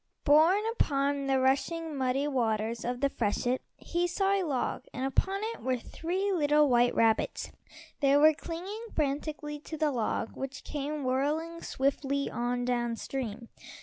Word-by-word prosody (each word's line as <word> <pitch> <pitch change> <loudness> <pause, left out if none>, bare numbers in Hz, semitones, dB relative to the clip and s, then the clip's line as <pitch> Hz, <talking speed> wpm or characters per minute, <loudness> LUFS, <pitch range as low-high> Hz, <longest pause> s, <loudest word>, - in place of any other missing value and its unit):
Borne 320 +8 +5
upon 280 - 0
the 270 -1 +3
rushing, 305 +5 0
muddy 265 +2 0
waters 230 -4 0
of 245 +1 -3
the 280 - +4
freshet 245 +2 0 0.2
he 345 +1 -1
saw 390 +3 +1
a 395 - +2
log, 275 -9 -2
and 255 - -3
upon 385 +9 0
it - - -12
were 255 0 0
three 365 +10 -2
little 300 -3 +4
white 245 -1 +3
rabbits. 225 -1 +1 0.5
They 280 -1 +4
were 310 +2 +7
clinging 365 +9 -6
frantically 295 0 -2
to 315 +2 -7
the 305 -1 +1
log, 230 -3 -1
which 270 +1 -6
came 295 0 -4
whirling 300 +6 -1
swiftly 275 +1 -1
on 245 +1 -1
down 240 -1 0
stream. 235 -2 -5
280 Hz, 150 wpm, -30 LUFS, 250-315 Hz, 0.5 s, were